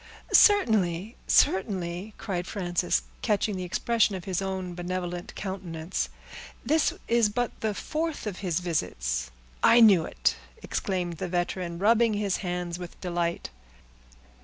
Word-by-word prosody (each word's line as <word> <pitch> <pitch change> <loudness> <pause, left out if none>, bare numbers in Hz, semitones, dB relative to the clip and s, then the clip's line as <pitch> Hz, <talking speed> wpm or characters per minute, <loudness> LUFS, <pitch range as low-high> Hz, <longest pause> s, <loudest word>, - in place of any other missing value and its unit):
"Certainly—certainly," 195 - +3
cried 180 -3 -3
Frances, 175 -3 0 0.2
catching 210 -1 +1
the 185 - -4
expression 215 +3 +1
of 185 - -6
his 190 -1 -1
own 190 -2 -3
benevolent 175 0 -4
countenance. 180 -3 -4 0.6
"This 315 +1 +2
is 230 -2 +3
but 245 +3 -1
the 215 -2 -1
fourth 315 +2 -3
of 205 -4 -4
his 180 -3 -1
visits." - - -2 0.3
"I 240 - +6
knew 200 -8 +7
it!" - - 0 0.3
exclaimed 180 -3 -2
the - - -2
veteran, 175 0 -2
rubbing 225 +3 +3
his 205 -2 0
hands 175 -2 -3
with 175 -1 -9
delight. 175 - -2
185 Hz, 125 wpm, -27 LUFS, 175-210 Hz, 0.6 s, knew